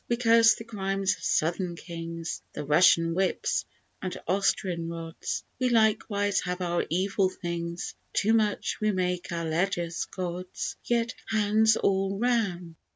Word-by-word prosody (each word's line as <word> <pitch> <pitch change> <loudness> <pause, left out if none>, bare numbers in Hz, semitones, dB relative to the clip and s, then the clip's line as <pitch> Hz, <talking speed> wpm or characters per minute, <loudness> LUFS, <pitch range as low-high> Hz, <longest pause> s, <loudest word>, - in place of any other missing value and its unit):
We 235 - +1
curse 230 -2 +6
the - - -8
crimes 195 -3 -1
of - - -18
Southern 170 +2 0
kings, 165 -1 -6
The 150 - -4
Russian 165 +2 +5
whips 185 +2 0 0.4
and 185 -1 -4
Austrian 185 -2 0
rods 165 -1 -5 0.2
We 255 -1 +2
likewise 210 -3 +2
have 180 0 -3
our 175 -1 -1
evil 190 +2 +1
things; 170 -1 -4 0.2
Too 220 +2 +2
much 215 -2 0
we 215 0 +2
make 180 -2 -1
our 170 -1 -2
Ledgers, 170 +1 -1
Gods. 180 0 -5
Yet 235 -1 +1
hands 220 0 +3
all 195 0 +1
round! 195 -8 0
185 Hz, 140 wpm, -27 LUFS, 170-210 Hz, 0.4 s, curse